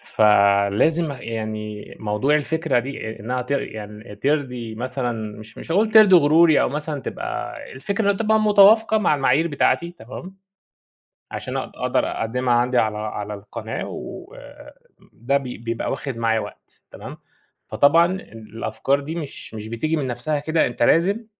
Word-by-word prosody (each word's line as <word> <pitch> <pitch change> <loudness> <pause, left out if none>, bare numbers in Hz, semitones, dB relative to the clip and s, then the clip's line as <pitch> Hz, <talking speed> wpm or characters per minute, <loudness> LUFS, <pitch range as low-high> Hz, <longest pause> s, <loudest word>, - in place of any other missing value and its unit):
فلازم 105 +10 +3
يعني 110 -2 -5
موضوع 110 +7 +1
الفكرة 155 -2 0
دي 130 -1 -6
آآ 110 - -7
إنّها 125 +4 -3
ت 125 +3 -8
يعني 105 -5 -5
ترضي 125 -3 -2
مثلًا 120 -3 -4
مش 110 +1 -14
مش - - -7
هاقول 215 +5 +2
ترضي 215 -4 +8
غروري، 160 0 +5
أو - - +1
مثلًا 150 -1 -4
تبقى - - -5 0.2
الفكرة 200 +9 0
تبقى 220 +2 +1
متوافقة 215 +1 +5
مع 190 -7 +2
المعايير 140 +4 +2
بتاعتي 170 +3 +1
تمام، 180 +11 -9 1.0
عشان - - -5
أبقى - - -7
أقدر - - +1
أقدّمها 125 +2 -1
عندي 125 +1 +2
على 110 -2 +1
على 105 -1 -5
القناة 100 0 -6
وآآ - - -10 0.4
ده 135 +5 0
ب 140 - -6
بيبقى 115 -2 -4
واخد 135 -5 -4
معايا 115 -1 +1
وقت - - -11
تمام، - - -9 0.5
فطبعًا 165 +4 +4
ال 115 - -10
الأفكار 135 +4 0
دي 150 +3 -6
مش 150 -8 -8
مش 110 -1 -7
بتيجي 115 +8 -2
من 145 -4 -2
نفسها 130 +5 -2
كده، 155 +1 +1
أنت 120 - -2
لازم 195 - +2
130 Hz, 150 wpm, -22 LUFS, 110-160 Hz, 1.0 s, ترضي